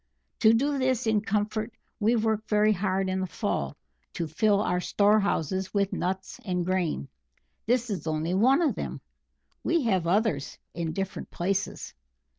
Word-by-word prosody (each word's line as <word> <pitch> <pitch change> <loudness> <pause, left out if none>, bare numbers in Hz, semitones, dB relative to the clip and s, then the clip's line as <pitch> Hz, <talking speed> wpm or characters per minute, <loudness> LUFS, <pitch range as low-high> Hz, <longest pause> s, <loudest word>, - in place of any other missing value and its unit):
To 220 -2 +6
do 275 +5 +2
this 260 -2 +1
in 220 -2 +2
comfort 215 +2 -1 0.3
we 225 +3 +3
work 220 -1 0
very 210 0 +4
hard 190 0 0
in 185 0 -1
the 190 - -1
fall 70 - -2 0.4
to 170 - -2
fill 200 +6 +2
our 180 -3 +1
storehouses 195 -3 +1
with 200 -1 +1
nuts 190 +1 -3
and 180 -3 -1
grain. 180 - -1 0.6
This 245 -1 +1
is 185 -4 -4
only 160 +2 -1
one 260 - +4
of 310 - +2
them - - -5 0.6
we 330 -2 +2
have 190 -7 +1
others 195 -6 +1 0.2
in 165 -2 -3
different 195 +1 -4
places. 195 +3 -2
200 Hz, 155 wpm, -27 LUFS, 180-220 Hz, 0.6 s, To